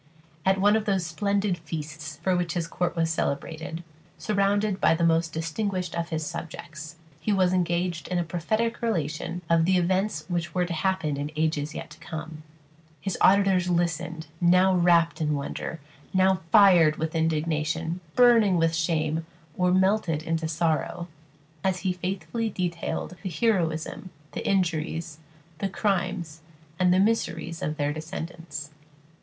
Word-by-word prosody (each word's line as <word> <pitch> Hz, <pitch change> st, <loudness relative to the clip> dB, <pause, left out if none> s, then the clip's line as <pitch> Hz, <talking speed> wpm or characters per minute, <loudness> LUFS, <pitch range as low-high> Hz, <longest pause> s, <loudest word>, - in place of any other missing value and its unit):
At 190 Hz, 0 st, +4 dB
one 205 Hz, +2 st, +5 dB
of 220 Hz, -1 st, 0 dB
those 195 Hz, -4 st, +1 dB
splendid 200 Hz, +1 st, 0 dB
feasts 155 Hz, -1 st, -6 dB
for 185 Hz, 0 st, +2 dB
which 175 Hz, -1 st, -1 dB
his 170 Hz, -2 st, -1 dB
court 175 Hz, +2 st, -2 dB
was 165 Hz, -1 st, +1 dB
celebrated, 160 Hz, +2 st, -3 dB, 0.3 s
surrounded 205 Hz, -1 st, +1 dB
by 165 Hz, -, +5 dB
the 170 Hz, -, -1 dB
most 165 Hz, 0 st, +3 dB
distinguished 180 Hz, +2 st, -2 dB
of 170 Hz, 0 st, -2 dB
his 160 Hz, -1 st, -2 dB
subjects, 155 Hz, 0 st, -7 dB, 0.2 s
he 210 Hz, -, -1 dB
was 185 Hz, -2 st, +3 dB
engaged 175 Hz, -1 st, 0 dB
in 180 Hz, -, -1 dB
a 175 Hz, -, +1 dB
prophetic 215 Hz, +8 st, -1 dB
relation 170 Hz, -5 st, -2 dB
of 165 Hz, 0 st, +4 dB
the 185 Hz, +1 st, +3 dB
events 185 Hz, -2 st, 0 dB
which 170 Hz, -1 st, -3 dB
were 180 Hz, -1 st, +2 dB
to 175 Hz, -, -4 dB
happen 165 Hz, -4 st, 0 dB
in 145 Hz, +1 st, -3 dB
ages 155 Hz, -1 st, -1 dB
yet -, -, -7 dB
to 150 Hz, -, -13 dB
come. 155 Hz, -1 st, -7 dB, 0.6 s
His 185 Hz, +5 st, -3 dB
auditors 190 Hz, -2 st, +4 dB
listened, 170 Hz, -1 st, -1 dB, 0.2 s
now 180 Hz, +2 st, +5 dB
wrapt 170 Hz, -1 st, +3 dB
in 150 Hz, -1 st, +1 dB
wonder, 145 Hz, +3 st, -4 dB, 0.4 s
now 190 Hz, -1 st, +4 dB
fired 180 Hz, -7 st, +7 dB
with 160 Hz, 0 st, -3 dB
indignation, 160 Hz, +1 st, 0 dB, 0.2 s
burning 230 Hz, -7 st, +6 dB
with 165 Hz, 0 st, +2 dB
shame, 160 Hz, -1 st, 0 dB, 0.3 s
or 180 Hz, 0 st, +2 dB
melted 190 Hz, -4 st, +2 dB
into 165 Hz, 0 st, -1 dB
sorrow, 165 Hz, +2 st, -1 dB, 0.5 s
as 185 Hz, -1 st, 0 dB
he 185 Hz, -1 st, 0 dB
faithfully 185 Hz, +4 st, -3 dB
detailed 180 Hz, -2 st, -3 dB
the 190 Hz, -, -3 dB
heroism, 175 Hz, -4 st, 0 dB, 0.2 s
the -, -, -5 dB
injuries, 165 Hz, -4 st, -1 dB, 0.4 s
the 195 Hz, -, -1 dB
crimes, 185 Hz, -5 st, -1 dB, 0.4 s
and 180 Hz, -1 st, +4 dB
the 185 Hz, -, +4 dB
miseries 170 Hz, -6 st, 0 dB
of 155 Hz, 0 st, -2 dB
their 145 Hz, -1 st, 0 dB
descendants. 155 Hz, -1 st, -6 dB
170 Hz, 150 wpm, -26 LUFS, 160-185 Hz, 0.6 s, fired